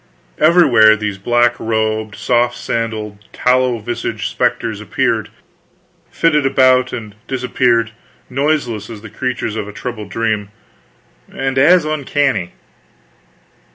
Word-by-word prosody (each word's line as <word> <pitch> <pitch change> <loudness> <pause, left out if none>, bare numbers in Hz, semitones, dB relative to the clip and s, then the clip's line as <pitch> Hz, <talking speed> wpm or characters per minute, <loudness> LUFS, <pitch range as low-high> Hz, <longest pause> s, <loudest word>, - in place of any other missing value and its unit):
Everywhere, 130 -10 +6
these 105 -2 -4
black 120 +4 +2
robed, 110 -1 -1
soft 120 0 +1
sandaled, 110 -3 -4
tallow 125 -1 +2
visaged 115 +2 -4
specters - - -1
appeared, - - -1 0.8
flitted 150 -3 +2
about 130 -1 +3
and 110 -3 -7
disappeared, 125 -3 +1 0.4
noiseless 135 -5 -1
as 110 -3 -9
the 110 - -10
creatures 125 -2 -3
of 105 -2 -4
a - - -7
troubled 110 -2 -7
dream, 105 -1 -2 0.8
and 135 0 -3
as 165 +4 +5
uncanny. 140 - -1
120 Hz, 110 wpm, -17 LUFS, 110-130 Hz, 0.8 s, Everywhere